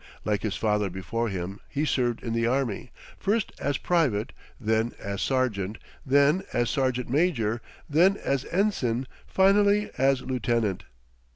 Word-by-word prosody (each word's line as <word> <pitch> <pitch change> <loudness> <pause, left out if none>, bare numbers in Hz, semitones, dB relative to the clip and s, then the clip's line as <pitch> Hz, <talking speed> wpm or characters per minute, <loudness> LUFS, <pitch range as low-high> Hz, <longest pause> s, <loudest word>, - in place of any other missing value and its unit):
Like 105 -1 0
his 110 -3 -2
father 105 -2 +1
before 110 +6 -3
him, 95 +1 -4
he 145 +2 -1
served 120 -5 0
in 115 - -2
the 115 0 +1
army, 125 -2 -1 0.3
first 210 +1 0
as 145 -1 0
private, 140 -12 +1 0.3
then 110 0 0
as 100 0 -4
sergeant, 110 -6 0 0.3
then 145 +5 +4
as 120 0 +1
sergeant 130 -3 0
major, 120 -6 +1 0.3
then 180 +7 +4
as 135 -7 -1
ensign, 135 - 0 0.2
finally 205 +2 +3
as 135 -1 +3
lieutenant. 115 -7 -1
125 Hz, 135 wpm, -27 LUFS, 110-145 Hz, 0.3 s, then